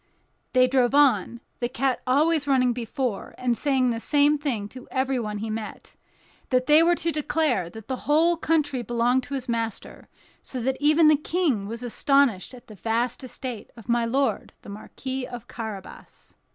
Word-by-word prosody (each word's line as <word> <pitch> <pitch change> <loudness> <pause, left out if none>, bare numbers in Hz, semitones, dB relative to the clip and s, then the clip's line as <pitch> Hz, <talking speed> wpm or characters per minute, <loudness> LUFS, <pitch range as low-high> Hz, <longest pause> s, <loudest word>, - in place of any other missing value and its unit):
They 255 0 +5
drove 255 0 +2
on—the 240 -2 +1
cat 260 0 -1
always 295 +3 +2
running 255 -3 +3
before 240 -2 -4
and 245 -1 0
saying 260 -2 +1
the 230 - -3
same 290 +3 +3
thing 240 -9 -2
to 255 +2 -12
everybody 250 -6 -2
he 220 0 -3
met, 215 -1 -7 0.5
that 255 -1 +2
they 300 +3 +6
were 345 +1 +4
to 335 0 -1
declare 295 - 0
that 220 +3 -11
the 260 - -3
whole 330 +3 +4
country 300 -5 0
belonged 240 +2 +1
to 280 - -5
his 260 -2 -5
master; 230 -3 -4 0.3
so 255 - -6
that 265 +2 -1
even 305 +2 +5
the 305 - +7
King 300 - -1
was 230 +3 -6
astonished 255 - +1
at 245 - -15
the 215 - -12
vast 230 +5 -1
estate 250 -2 -6
of 230 - -13
my 240 0 +2
lord 265 +4 -1
the - - -11
Marquis 260 +5 -6
of 240 -1 -9
Carabas. 215 -4 -9
255 Hz, 170 wpm, -25 LUFS, 230-285 Hz, 0.5 s, the